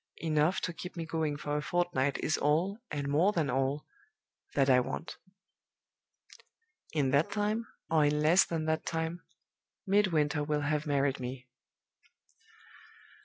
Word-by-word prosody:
Enough 155 +2 +2
to 180 - -2
keep 180 +2 -8
me 165 - -3
going 160 -2 -1
for 145 0 -2
a - - -1
fortnight 150 -5 0
is 155 - +2
all, 170 +9 +1
and 145 -1 -3
more 160 +8 +3
than 155 -7 0
all, 135 +3 0 0.7
that 135 -2 +3
I 130 -2 +6
want. 125 +6 -4 1.7
In 140 -4 +1
that 140 +4 +3
time, 215 +2 -1 0.2
or 155 -1 +3
in 150 +1 +2
less 160 +5 +5
than 160 -2 -3
that 160 0 0
time, 165 +1 -3 0.6
Midwinter 165 -7 +2
will 150 0 -1
have 150 +1 -1
married 140 -1 +1
me." 125 0 -6
150 Hz, 140 wpm, -31 LUFS, 145-170 Hz, 1.7 s, I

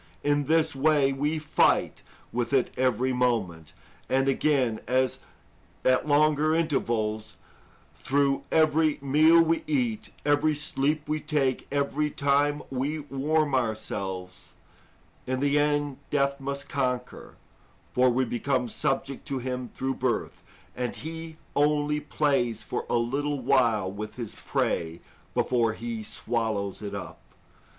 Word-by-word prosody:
In 145 0 +2
this 160 0 +2
way 140 -1 +3
we 145 +4 -1
fight 155 0 +2 0.3
with 120 +1 -1
it 130 -2 +2
every 130 0 +1
moment, 110 -11 -1 0.4
and 135 +1 +2
again, 135 -5 +2
at 130 +1 +1 0.9
longer 155 +1 +3
intervals, 110 -9 -1 0.6
through 140 0 +1
every 155 -1 +3
meal 155 +4 +5
we 165 0 0
eat, 125 -7 -1 0.2
every 150 +1 +3
sleep 150 0 -1
we 155 +1 -1
take, 140 -5 -1
every 145 +1 0
time 145 +1 +1
we 135 +4 -1
warm 150 +1 0
ourselves, 100 -6 -3 0.7
&c. 130 - -1
In 130 - 0
the 145 +1 +2
end, 145 -1 +1
death 140 -1 +1
must 140 +1 -4
conquer, 125 -3 -3 0.6
for 125 0 +4
we 130 +2 +1
became 125 +1 -1
subject 135 +1 -2
to 135 - -2
him 125 -1 -4
through 135 0 -2
birth, 130 -3 -2 0.3
and 125 -1 -3
he 160 0 -7 0.2
only 150 0 +2
plays 135 -7 0
for - - -4
a - - +2
little 140 +5 -1
while 115 -7 +2
with 105 +2 -7
his 115 -4 -6
prey 80 0 -2 0.4
before 115 -3 +2
he 115 0 -5
swallows 110 -3 -2
it 100 -1 -5
up. 100 - -7
135 Hz, 125 wpm, -27 LUFS, 120-150 Hz, 0.9 s, meal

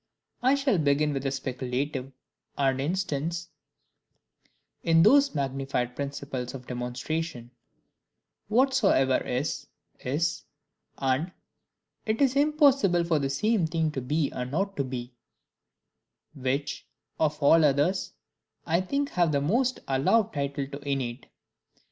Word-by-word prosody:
I 260 +3 +4
shall 275 - +1
begin 145 0 +2
with 135 - -2
the 135 - -1
speculative, 130 +1 -3 0.5
and 135 -1 +1
instance 170 0 -2 1.3
in 165 0 +4
those 280 - +5
magnified 135 -3 -2
principles 140 -2 -4
of 130 -2 -9
demonstration, 125 +2 -4 1.0
"Whatsoever 215 - +3
is, 130 +5 -3 0.3
is," 145 +6 -1 0.5
and 135 +6 0 0.8
"It 220 +1 0
is 270 -2 +3
impossible 275 - +4
for 165 -2 +1
the 135 -1 -1
same 195 +5 +1
thing 160 -1 0
to 135 - -4
be 145 +3 0
and 125 0 -4
not 195 +7 -1
to 140 - +1
be"; 125 -1 -6 1.2
which, 140 +1 -3 0.3
of 155 -1 +1
all 160 +3 +6
others, 150 +6 +2 0.5
I 170 +2 +2
think 280 +9 -1
have 175 -3 +2
the 140 - +2
most 245 - +1
allowed 145 +12 +2
title 140 -1 -2
to 140 +1 -8
innate. 135 -4 -3
145 Hz, 120 wpm, -27 LUFS, 135-180 Hz, 1.3 s, all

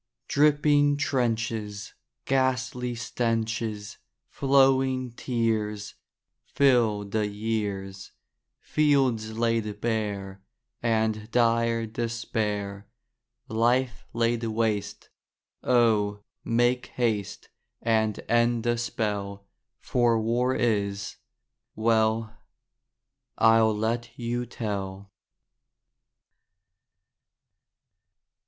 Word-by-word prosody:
Dripping 145 0 +3
trenches, 115 -6 -2 0.3
Ghastly 130 -2 0
stenches, 115 -3 -2 0.3
Flowing 135 -2 +3
tears, 110 -4 -2 0.5
Fill 120 -7 +3
the 105 +1 -1
years, 100 -2 -4 0.5
Fields 130 -8 +1
laid 115 -3 0
bare, 100 -4 -3 0.4
And 110 -2 0
dire 115 -1 +2
despair, 110 -3 -3 0.6
Life 120 +3 0
laid 115 0 0
waste, 110 -2 -2 0.5
O, 105 -4 +2 0.2
make 120 +2 +1
haste 110 -5 -2 0.3
And 110 -2 +1
end 120 0 +2
the 120 -1 0
spell, 100 -4 -3 0.4
For 120 -2 +2
war 120 +3 +1
is—well, 110 +1 -1 1.0
I'll 115 -1 +4
let 115 +2 -2
you 120 0 -3
tell. 100 -4 -5
115 Hz, 65 wpm, -26 LUFS, 105-120 Hz, 1.0 s, I'll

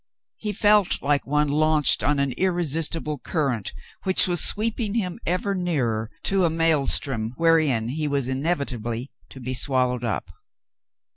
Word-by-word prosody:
He 210 - -3
felt 205 -1 +3
like 145 0 +1
one 150 +1 +1
launched 155 0 +3
on 145 +1 +1
an 140 -1 0
irresistible 165 -2 -1
current 135 - -2 0.3
which 190 -1 +5
was 175 -2 +1
sweeping 220 0 -1
him 190 -2 -2
ever 185 +3 0
nearer 130 - -1
to 195 -1 +1
a 170 - +3
mael 160 -3 +1
strom 115 -3 0
wherein 155 -9 +2
he 150 +3 -2
was 140 -3 -1
inevitably 130 -4 -3 0.2
to 130 - -12
be 130 0 -4
swallowed 125 -1 0
up. 115 - -3
150 Hz, 145 wpm, -23 LUFS, 130-175 Hz, 0.3 s, which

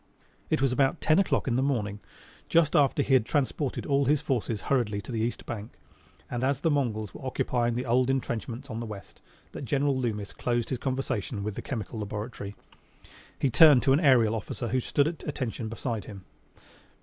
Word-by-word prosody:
It 135 - +1
was 135 - +3
about 135 +5 +2
ten 155 +3 +3
o'clock 195 - +1
in 120 -2 +1
the - - +2
morning, 110 -7 -1 0.5
just 165 -3 +3
after 145 0 +4
he 135 - +1
had 130 -4 +6
transported 140 +1 -1
all 140 0 +2
his 145 +2 +3
forces 115 -5 -2
hurriedly 115 -7 0
to 100 - -8
the 115 - -2
east 115 +2 -2
bank, 110 -1 -6 0.5
and 120 0 -3
as 135 0 +1
the 165 - +2
Mongols 110 -8 -1
were - - -10
occupying 120 -2 0
the 125 - -2
old 125 +2 +2
entrenchments 125 0 -3
on 110 - -4
the 115 - -5
west, 105 -2 -10 0.3
that - - -7
General 140 +2 +1
Loomis 110 -6 -2
closed 120 -2 -1
his 130 - -1
conversation 130 -5 -2
with 105 0 -3
the - - -5
Chemical 115 -3 -5
Laboratory. 105 0 -5 0.8
He 135 - +1
turned 150 -2 +7
to 135 0 +4
an 140 - +4
aerial 125 -8 +5
officer 115 +2 -4
who 130 +4 +1
stood 140 +3 +1
at 160 -1 -5
attention 120 -6 -3
beside 115 -1 -4
him. 100 -4 -10
125 Hz, 195 wpm, -28 LUFS, 110-135 Hz, 0.8 s, turned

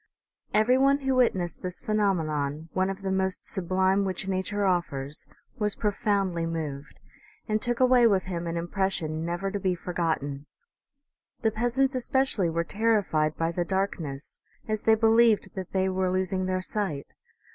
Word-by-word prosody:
Every 240 +5 +4
one 275 +1 +4
who 265 -1 +1
witnessed 190 -9 +1
this 180 -1 -2
phenomenon, 160 -8 -1
one 185 +1 +1
of 195 0 -6
the 190 - -1
most 190 0 0
sublime 190 +2 +1
which 190 0 -3
nature 195 +2 -1
offers, 150 -6 -1 0.3
was 210 -1 0
profoundly 200 -5 0
moved, 150 -3 -5 0.5
and 215 -1 0
took 240 -1 0
away 255 -2 +6
with 195 -4 +2
him 175 -2 -4
an 170 0 -2
impression 170 -3 -1
never 175 +3 -2
to 205 - -2
be 185 -2 0
forgot 170 -3 -1
ten. 140 +1 -6 1.0
The 220 - +3
peasants 245 +5 +1
especially 255 - +1
were 165 +1 0
terrified 195 -7 +1
by 165 0 0
the 175 +1 -1
dark 195 +2 -1
ness, 140 -3 -7 0.3
as 215 -1 -1
they 220 - +5
believed 225 0 +4
that 190 -2 -6
they 190 0 +1
were 185 0 0
losing 185 0 0
their 185 0 0
sight. 185 -8 -3
190 Hz, 160 wpm, -27 LUFS, 170-215 Hz, 1.0 s, away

